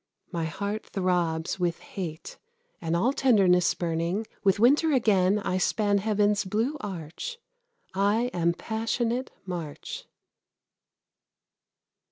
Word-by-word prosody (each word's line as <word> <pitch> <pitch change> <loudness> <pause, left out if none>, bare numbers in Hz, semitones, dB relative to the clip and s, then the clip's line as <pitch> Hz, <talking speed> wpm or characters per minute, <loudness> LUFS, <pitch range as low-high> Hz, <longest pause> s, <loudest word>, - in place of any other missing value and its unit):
My 165 -1 -1
heart 200 +6 -4
throbs 175 -3 0
with 175 -2 0
hate, 165 -4 -7 0.4
and 165 0 -1
all 235 +10 +2
tenderness 195 -10 +4
spurning, 170 +5 -1 0.2
With 195 0 +3
winter 290 +8 +5
again 205 -6 +3
I 185 -3 -1
span 205 +1 +2
heaven's 210 0 +2
blue 220 +9 -1
arch. 185 - -6 0.6
I 205 +6 +2
am 170 -1 +2
passionate 230 +4 -1 0.2
March. 170 -6 -6
195 Hz, 105 wpm, -27 LUFS, 175-220 Hz, 0.6 s, winter